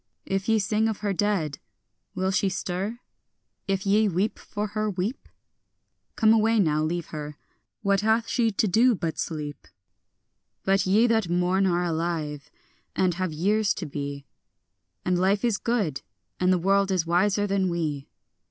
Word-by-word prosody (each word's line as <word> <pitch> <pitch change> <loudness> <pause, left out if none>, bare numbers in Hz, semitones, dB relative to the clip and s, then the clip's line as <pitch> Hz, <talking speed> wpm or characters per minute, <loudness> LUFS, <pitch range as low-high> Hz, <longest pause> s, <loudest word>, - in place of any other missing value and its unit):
If 195 +2 -2
ye 225 - +4
sing 215 +1 +1
of 220 -2 -3
her 205 -2 0
dead, 185 -8 0 0.6
will 190 +1 0
she 195 0 +1
stir? 190 +5 -3 0.7
if 195 0 -1
ye 210 +2 +4
weep 195 +3 -1
for 210 0 -4
her, 215 +1 -1
weep? 195 +6 -4 0.9
Come 220 -1 +5
away 225 0 +3
now, 155 -5 +2
leave 165 +2 -2
her; 150 -1 -6 0.5
what 200 -1 +2
hath 220 +2 +2
she 235 -3 +2
to 215 +1 0
do 230 +6 +4
but 165 -4 -3
sleep? 150 -3 -5 1.0
But 195 0 +2
ye 210 +5 +4
that 220 -6 +1
mourn 180 +2 +2
are 175 -1 +1
alive, 160 -3 -2 0.5
and 185 -2 +2
have 185 0 -2
years 200 +7 +1
to 175 - -5
be; 140 -1 -5 0.8
And 180 -1 +1
life 195 +4 +2
is 225 -4 +1
good, 205 - -1 0.4
and 185 0 +3
the 185 - +4
world 195 +2 +2
is 185 -3 +1
wiser 195 +4 +2
than 195 -2 +1
we. 155 -5 -3
190 Hz, 160 wpm, -26 LUFS, 170-210 Hz, 1.0 s, Come